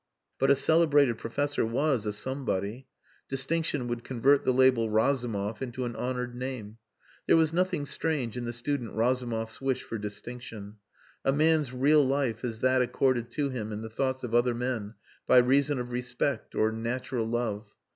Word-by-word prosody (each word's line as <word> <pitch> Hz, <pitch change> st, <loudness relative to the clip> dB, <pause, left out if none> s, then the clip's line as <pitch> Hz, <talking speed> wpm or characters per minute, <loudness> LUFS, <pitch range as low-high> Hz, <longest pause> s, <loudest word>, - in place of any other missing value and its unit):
But 135 Hz, -, +3 dB
a 140 Hz, -, +7 dB
celebrated 145 Hz, -5 st, +3 dB
professor 145 Hz, +5 st, -1 dB
was 125 Hz, 0 st, 0 dB
a -, -, 0 dB
somebody. 120 Hz, -1 st, -2 dB, 0.4 s
Distinction 135 Hz, 0 st, 0 dB
would 120 Hz, -1 st, -3 dB
convert 135 Hz, +3 st, +3 dB
the -, -, +2 dB
label 130 Hz, -3 st, +4 dB
Razumov 110 Hz, -3 st, 0 dB
into 125 Hz, -1 st, -3 dB
an 120 Hz, -1 st, -4 dB
honoured 125 Hz, 0 st, -3 dB
name. 120 Hz, -4 st, -6 dB, 0.5 s
There -, -, +6 dB
was 160 Hz, -1 st, +3 dB
nothing 180 Hz, -4 st, 0 dB
strange 145 Hz, -6 st, -2 dB
in 125 Hz, -1 st, -4 dB
the 120 Hz, -, -2 dB
student 120 Hz, 0 st, -3 dB
Razumov's 115 Hz, -1 st, -1 dB
wish 135 Hz, -1 st, -1 dB
for 115 Hz, -, -5 dB
distinction. 105 Hz, 0 st, -7 dB, 0.5 s
A 135 Hz, -, +3 dB
man's 155 Hz, -1 st, +2 dB
real 145 Hz, +4 st, +4 dB
life 130 Hz, -4 st, 0 dB
is 115 Hz, -3 st, -4 dB
that 130 Hz, 0 st, +3 dB
accorded 125 Hz, -1 st, +1 dB
to 145 Hz, -2 st, 0 dB
him 110 Hz, -5 st, -4 dB
in 105 Hz, +1 st, -5 dB
the 110 Hz, -, -7 dB
thoughts 130 Hz, +2 st, -1 dB
of 120 Hz, -2 st, -5 dB
other 120 Hz, 0 st, +3 dB
men 115 Hz, -3 st, -3 dB, 0.3 s
by -, -, +6 dB
reason 140 Hz, +3 st, +4 dB
of 125 Hz, 0 st, -4 dB
respect 125 Hz, 0 st, -2 dB
or 110 Hz, 0 st, +2 dB
natural 115 Hz, +1 st, -3 dB
love. 110 Hz, -3 st, -2 dB
125 Hz, 165 wpm, -28 LUFS, 115-135 Hz, 0.5 s, a